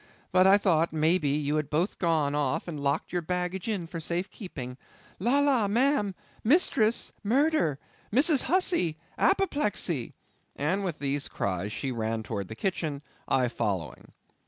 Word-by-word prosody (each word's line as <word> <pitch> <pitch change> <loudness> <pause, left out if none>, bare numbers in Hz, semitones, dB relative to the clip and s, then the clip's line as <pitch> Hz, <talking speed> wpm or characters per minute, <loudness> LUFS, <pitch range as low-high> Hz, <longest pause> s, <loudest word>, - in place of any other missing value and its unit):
But 185 +1 +5
I 195 +1 +7
thought, 170 -5 +2
may 160 +3 +2
be, 145 -2 0
you 150 0 0
had 150 -2 -2
both 165 +6 -1
gone 160 -5 +1
off 145 0 -1
and 155 -4 -5
locked 140 +4 -1
your 175 - 0
baggage 180 +3 -2
in 200 -6 -1
for 165 0 -6
safe 175 +4 -3
keeping. 130 - -7 0.4
La! 240 +9 +2
la, 275 -7 +3
ma'am!—Mistress! 230 - +1
murder! 250 - +2 0.3
Mrs. 275 +5 +4
Hussey! 345 - +2 0.2
apoplexy!"—and 195 - -1
with 175 -5 -3
these 140 0 -1
cries, 95 +1 -2
she 135 +4 -3
ran 110 -1 -2
towards 100 -4 -4
the 110 - -6
kitchen, 155 - -2 0.2
I 130 -2 +2
following. 95 - -3
170 Hz, 145 wpm, -28 LUFS, 140-205 Hz, 0.4 s, I